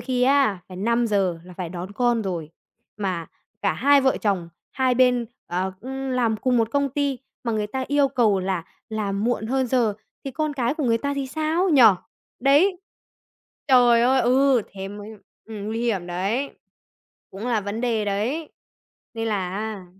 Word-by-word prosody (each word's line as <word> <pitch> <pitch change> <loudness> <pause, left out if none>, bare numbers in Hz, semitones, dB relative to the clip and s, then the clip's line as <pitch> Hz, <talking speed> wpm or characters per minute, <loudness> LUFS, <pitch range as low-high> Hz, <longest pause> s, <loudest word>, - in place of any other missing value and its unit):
khi 250 0 -1
á, 265 -7 +3
phải 185 - -9
5:00 205 -4 +1
là 180 - -12
phải 180 -1 -5
đón 180 +3 -7
con 240 +1 +1
rồi, 170 -6 -4 0.5
mà 185 -5 -3 0.4
cả - - +2
hai 285 +1 +4
vợ 265 -1 +2
chồng 195 -6 0 0.2
hai 260 -2 +1
bên, 250 -1 +3 0.2
ờ, 185 +2 -2
cũng 265 +2 -5
làm 240 -3 +1
cùng 250 +3 +1
một 225 -1 +1
công 280 +1 +1
ty 280 -1 -1 0.3
mà 235 - -1
người 215 -1 -1
ta 260 +5 -3
yêu 285 0 +3
cầu 225 -7 +2
là 185 -3 -2 0.2
làm 205 -2 -2
muộn 240 -2 0
hơn 260 +2 0
giờ, 235 -4 +1 0.3
thì 275 - -4
con 305 +3 -2
cái 255 -1 0
của 310 - -2
người 230 -2 +2
ta 280 +3 -2
thì 275 -1 -2
sao, 315 +6 0
nhỉ? 290 -7 +6 0.6
Đấy. 295 +9 +4 0.9
Trời 245 -3 +6
ơi, 260 +2 +4
ừ, 255 0 +3
thế 195 -1 -6
mới 205 +1 -9 0.4
ừm, 215 -2 -7
nguy 225 +2 -2
hiểm 205 -7 -1
đấy, 195 +10 -1 0.8
cũng 200 +5 -7
là 235 -3 +1
vấn 205 +3 -4
đề 230 -3 0
đấy, 230 +11 -2 0.6
nên 225 0 -2
là 195 -4 -1
á 205 -1 -5
235 Hz, 180 wpm, -23 LUFS, 200-265 Hz, 0.9 s, nhỉ